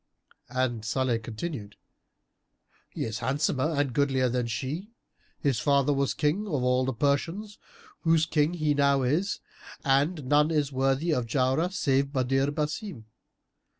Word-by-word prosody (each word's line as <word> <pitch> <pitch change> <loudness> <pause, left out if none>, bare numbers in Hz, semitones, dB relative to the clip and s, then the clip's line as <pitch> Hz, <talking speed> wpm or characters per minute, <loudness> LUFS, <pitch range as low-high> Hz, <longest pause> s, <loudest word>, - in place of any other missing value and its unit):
And 120 -3 -1
Salih 120 +1 0
continued, 110 -1 -6 1.1
"He - - -4
is 110 -1 -3
handsomer 135 +3 0
and 140 -4 0
goodlier 135 -2 +2
than 125 0 -1
she; 135 - -4 0.5
his 140 -4 +1
father 140 0 +3
was 140 -1 0
King 175 +9 0
of 145 -9 -1
all 125 0 +2
the 130 - 0
Persians, 165 - -1 0.4
whose 165 -1 +3
King 155 +2 +1
he 155 -3 +1
now 140 -1 +3
is, 160 +10 0 0.4
and 145 +3 +2
none 150 +3 +4
is 150 -3 0
worthy 135 +5 +1
of 125 -5 -1
Jauharah 130 +7 +1
save 140 -7 +1
Badr 135 0 +1
Basim. 150 - -3
140 Hz, 140 wpm, -27 LUFS, 130-150 Hz, 1.1 s, none